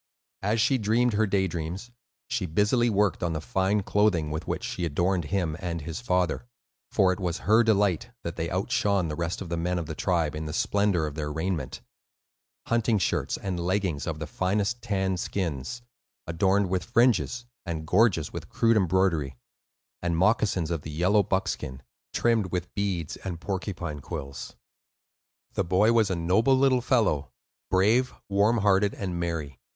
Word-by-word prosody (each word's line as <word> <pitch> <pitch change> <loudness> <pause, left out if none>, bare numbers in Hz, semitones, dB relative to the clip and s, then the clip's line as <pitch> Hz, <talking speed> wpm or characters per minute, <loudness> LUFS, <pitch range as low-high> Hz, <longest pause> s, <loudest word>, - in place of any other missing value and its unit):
As 105 +4 +1
she 130 +4 +3
dreamed 115 +3 +2
her 110 +1 +2
daydreams, 95 +2 -2 0.4
she 120 -7 -2
busily 105 +8 +2
worked 105 -2 +1
on 85 -1 0
the 80 - -2
fine 95 +5 0
clothing 100 -7 +2
with 80 +2 -4
which - - -2
she 90 - -4
adorned 85 +2 0
him 80 -1 -1
and 85 -2 -3
his 80 +5 -5
father; 90 +1 0 0.4
for 95 -3 +3
it 90 - -7
was 90 -2 -2
her 110 +2 +6
delight 105 -6 +2
that 85 - -4
they 85 0 -2
outshone 95 -1 +1
the 75 - -3
rest 85 +3 -3
of 90 - -9
the 85 - -2
men 90 +2 -1
of 85 - -2
the 80 - -5
tribe 85 -2 0
in 75 +1 -4
the 75 - -5
splendor 100 -2 +1
of 75 - -4
their 75 -1 -4
raiment,—hunting 95 - -4
shirts 95 - 0
and 95 -3 -3
leggings 90 -4 -1
of 80 -2 -2
the 80 - -4
finest 100 +8 -1
tanned 95 -2 -1
skins, 85 - -3 0.4
adorned 95 +4 +2
with 90 -2 0
fringes 120 +2 +2 0.2
and 80 -3 -4
gorgeous 90 -3 +2
with - - -7
crude 115 -1 +3
embroidery, 85 - +1 0.6
and 85 -1 0
moccasins 95 -3 +2
of 85 -3 -1
the 75 - -8
yellow 90 +7 +3
buckskin, 95 -8 -2 0.3
trimmed 115 -5 +1
with 90 -1 -3
beads 95 -6 -2
and 90 -4 -6
porcupine 90 -5 -4
quills. 70 -1 -7 1.0
The - - 0
boy 95 +6 +3
was 110 -3 +3
a 95 - 0
noble 95 +10 +3
little 130 -2 +3
fellow; 110 - +1 0.4
brave, 110 +7 +3
warm 100 +4 +3
hearted, 100 -1 +3
and 90 -3 -4
merry. 80 -6 -3
95 Hz, 165 wpm, -27 LUFS, 85-105 Hz, 1.0 s, her